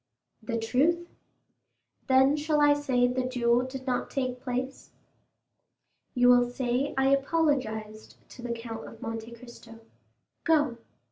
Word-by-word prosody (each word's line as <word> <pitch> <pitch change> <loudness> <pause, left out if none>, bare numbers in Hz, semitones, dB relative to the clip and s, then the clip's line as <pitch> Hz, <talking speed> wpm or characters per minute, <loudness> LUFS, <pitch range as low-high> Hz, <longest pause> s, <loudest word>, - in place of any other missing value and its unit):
"The 230 +1 -3
truth." 295 +10 +1 1.0
"Then 265 +1 +5
I - - +2
shall 295 -1 +3
say 260 -4 +1
the 250 +1 0
duel 245 -1 +1
did 260 +1 -7
not 250 -2 -1
take 255 -2 -3
place?" 255 +2 -4 1.3
"You 245 0 +4
will 245 0 +5
say 250 +2 -1
I 270 0 +3
apologized 270 -7 -1
to 245 - -12
the 240 0 -4
Count 230 -1 -6
of 230 - -12
Monte 225 0 -6
Cristo. 235 -1 -13 0.6
Go." 295 -7 +2
250 Hz, 130 wpm, -28 LUFS, 235-275 Hz, 1.3 s, Then